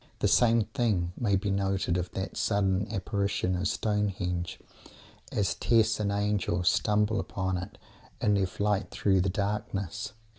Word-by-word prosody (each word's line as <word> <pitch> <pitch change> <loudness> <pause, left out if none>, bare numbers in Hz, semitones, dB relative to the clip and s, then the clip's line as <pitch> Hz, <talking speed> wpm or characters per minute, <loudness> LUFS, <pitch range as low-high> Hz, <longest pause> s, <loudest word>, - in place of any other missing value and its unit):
The - - +1
same 115 -2 +4
thing 105 -7 -1
may 105 -4 +1
be 100 +1 0
noted 95 -2 0
of 90 -1 -2
that 95 - -4
sudden 100 -1 +1
apparition 100 -2 -1
of 90 +1 0
Stonehenge, 95 -5 -1 0.7
as 100 -2 +1
Tess 110 -2 +2
and 100 -1 0
Angel 100 -3 0
stumble 105 +4 +2
upon 95 0 -2
it 90 +3 -8 0.4
in 105 - +2
their 100 -2 +2
flight 100 0 -1
through 95 -2 +2
the 95 - +1
darkness. 100 +1 -3
100 Hz, 145 wpm, -29 LUFS, 95-105 Hz, 0.7 s, same